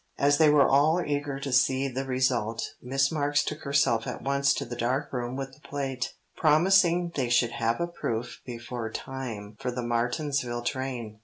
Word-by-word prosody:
As 145 +1 +3
they 155 -1 +6
were 145 -2 +5
all 150 +5 +4
eager 145 -1 -2
to 140 0 -4
see 130 +2 +3
the 135 +1 -3
result, 125 -4 0
Miss 135 +3 +1
Marks 145 -2 +1
took 150 - -4
herself 140 -5 +1
at - - -5
once 140 0 +2
to 140 - -3
the 120 0 -6
dark 130 +5 -1
room 125 0 -3
with 135 0 -5
the 135 - -18
plate, 135 -4 -4 0.2
promising 175 +2 +4
they 130 -4 -1
should 120 -1 +3
have 115 0 -1
a 170 - +1
proof 120 -9 -4
before 120 -1 -5
time 110 -7 -6
for 125 - -2
the 125 0 -3
Martinsville 120 +1 -1
train. 120 -4 -4
135 Hz, 180 wpm, -27 LUFS, 120-145 Hz, 0.2 s, they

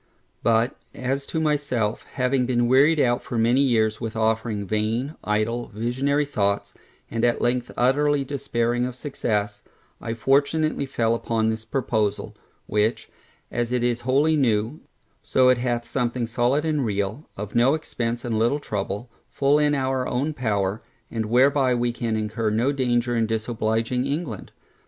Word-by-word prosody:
But, 115 +1 +2 0.2
as 135 +2 -2
to 160 - -2
myself, 140 -8 -1
having 125 -1 +1
been 120 -1 +2
wearied 140 +5 +5
out 120 -3 +2
for 120 - -5
many 120 +4 +3
years 110 -5 +2
with 115 -1 -4
offering 110 -1 0
vain, 110 +7 -1
idle, 110 +3 -1
visionary 130 +7 0
thoughts, 100 -7 -1 0.4
and 115 0 -2
at 120 -1 +2
length 120 0 0
utterly 145 +3 +2
despairing 120 -3 -1
of 125 - -7
success, 105 -6 -2 0.4
I 115 0 -3
fortunately 140 +4 +1
fell 115 -3 +1
upon 115 -1 0
this 110 0 -5
proposal, 110 -4 -1 0.3
which, 105 +3 0 0.4
as 120 0 -2
it 125 -1 0
is 120 -1 0
wholly 140 +6 +2
new, 115 -1 +1 0.4
so 125 +4 +3
it 125 -1 +4
hath 120 -1 -1
something 120 -1 -1
solid 125 +6 +1
and 150 -3 +1
real, 105 +5 -2
of 105 +1 -6
no 125 +5 +4
expence 120 -6 -3
and 115 -2 -1
little 120 +6 +2
trouble, 105 -2 -4 0.2
full 140 +2 +2
in 150 -1 +3
our 130 -1 0
own 140 +5 -1
power, 105 -5 -1 0.3
and 110 -2 -2
whereby 130 +2 +3
we 120 0 0
can 115 -2 -2
incur 110 +1 -1
no 115 +6 +1
danger 120 -3 0
in 115 -1 +1
disobliging 115 +2 -1
England. 140 - -4
120 Hz, 155 wpm, -24 LUFS, 110-135 Hz, 0.4 s, wearied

